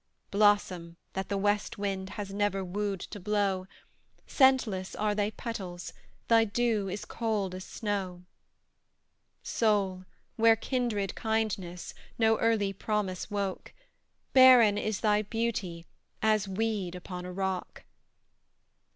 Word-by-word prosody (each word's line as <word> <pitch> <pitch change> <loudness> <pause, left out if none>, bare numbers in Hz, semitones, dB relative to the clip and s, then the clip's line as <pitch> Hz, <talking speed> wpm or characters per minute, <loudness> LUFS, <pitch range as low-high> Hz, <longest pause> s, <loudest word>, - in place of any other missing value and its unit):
Blossom 195 -5 +2 0.2
that 190 0 -4
the 200 - 0
west 205 +1 0
wind 195 -2 -3
Has 200 -2 -5
never 200 -1 0
wooed 195 0 -2
to 205 - -7
blow, 195 -2 0 0.6
Scentless 250 -9 +2
are 210 0 0
thy 205 0 0
petals, 190 -6 -6 0.3
Thy 230 -1 +6
dew 220 -2 0
is 200 +2 -5
cold 215 -5 -2
as 185 0 -7
snow! 190 -4 -3 1.2
Soul 195 -4 +1 0.3
where 225 0 +6
kindred 225 -5 -1
kindness, 210 -6 -2 0.2
No 225 -1 +3
early 215 -4 +2
promise 195 -2 -2
woke, 200 -2 -3 0.6
Barren 250 -6 +8
is 215 -1 -2
thy 210 -1 +3
beauty, 205 -6 -3 0.4
As 215 -2 +3
weed 195 -2 -2
upon 180 0 -7
a 180 - -6
rock. 190 0 -3
205 Hz, 115 wpm, -29 LUFS, 190-220 Hz, 1.2 s, Barren